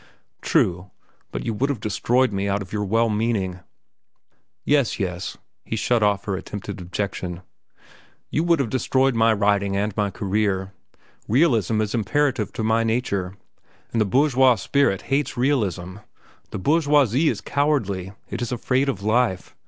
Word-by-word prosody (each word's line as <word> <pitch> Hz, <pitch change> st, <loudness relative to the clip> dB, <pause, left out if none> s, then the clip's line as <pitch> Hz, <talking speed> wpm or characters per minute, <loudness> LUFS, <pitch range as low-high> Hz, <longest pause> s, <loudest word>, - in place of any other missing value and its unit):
"True; 90 Hz, +2 st, +1 dB, 0.4 s
but -, -, -5 dB
you 115 Hz, -, -1 dB
would 130 Hz, +7 st, 0 dB
have 140 Hz, -6 st, -2 dB
destroyed 120 Hz, +3 st, +1 dB
me 100 Hz, +1 st, -1 dB
out 100 Hz, 0 st, 0 dB
of 95 Hz, -, -14 dB
your 105 Hz, -1 st, -1 dB
well 115 Hz, +4 st, +2 dB
meaning." 105 Hz, -4 st, -1 dB, 1.1 s
"Yes, 140 Hz, -6 st, +2 dB
yes," 90 Hz, -2 st, -3 dB, 0.3 s
he -, -, -4 dB
shut 115 Hz, +1 st, +1 dB
off 100 Hz, -1 st, +2 dB
her 100 Hz, -, -1 dB
attempted 100 Hz, 0 st, -6 dB
objection. 90 Hz, -1 st, -4 dB, 0.9 s
"You 155 Hz, -, +1 dB
would 170 Hz, -1 st, +4 dB
have 130 Hz, -6 st, -1 dB
destroyed 130 Hz, +1 st, +2 dB
my 115 Hz, 0 st, +4 dB
writing 100 Hz, -2 st, +1 dB
and 105 Hz, 0 st, -1 dB
my 105 Hz, -2 st, 0 dB
career. 100 Hz, -1 st, -1 dB, 0.5 s
Realism 115 Hz, -, +2 dB
is 105 Hz, -2 st, -2 dB
imperative 125 Hz, 0 st, 0 dB
to 110 Hz, -, -3 dB
my 110 Hz, +1 st, +2 dB
nature, 100 Hz, -5 st, -1 dB, 0.5 s
and 115 Hz, -, +1 dB
the -, -, +3 dB
bourgeois 130 Hz, +2 st, +4 dB
spirit 110 Hz, -1 st, +1 dB
hates 140 Hz, -2 st, 0 dB
realism. 100 Hz, -, 0 dB, 0.5 s
The -, -, -5 dB
bourgeoisie 145 Hz, -, +3 dB
is -, -, -2 dB
cowardly. 105 Hz, -11 st, -1 dB
It -, -, -5 dB
is 120 Hz, -, -3 dB
afraid 130 Hz, +3 st, 0 dB
of 100 Hz, -7 st, -3 dB
life. 110 Hz, -4 st, 0 dB
110 Hz, 150 wpm, -23 LUFS, 100-130 Hz, 1.1 s, would